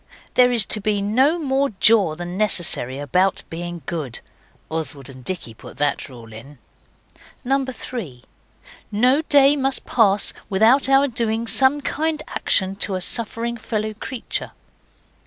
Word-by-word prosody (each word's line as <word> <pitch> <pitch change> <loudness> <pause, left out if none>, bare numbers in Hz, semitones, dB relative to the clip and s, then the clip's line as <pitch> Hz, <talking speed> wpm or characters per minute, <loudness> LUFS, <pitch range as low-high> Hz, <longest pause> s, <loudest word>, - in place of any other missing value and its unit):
There 250 0 +5
is 235 -4 +4
to 215 - 0
be 205 0 0
no 255 +11 +2
more 275 -3 0
jaw 205 -8 +4
than 175 +1 -6
necessary 175 - 0
about 180 +7 0
being 175 -1 -6
good. 150 -7 -5 0.5
(Oswald 155 -4 -4
and 130 -1 -14
Dicky 160 -8 -4
put 110 - -13
that 145 0 -1
rule 115 -3 -13
in.) 135 +7 -12 0.9
3. 250 - -3 0.7
No 250 +8 +3
day 285 -2 +4
must 270 -1 -1
pass 205 -4 +2 0.2
without 225 +8 +4
our 275 +1 +5
doing 230 -2 -1
some 265 +6 +3
kind 310 +2 -2
action 190 0 +1
to 200 -2 +2
a - - -2
suffering 230 +3 -1
fellow 215 -1 -3
creature. 230 +3 -5
215 Hz, 140 wpm, -21 LUFS, 170-260 Hz, 0.9 s, There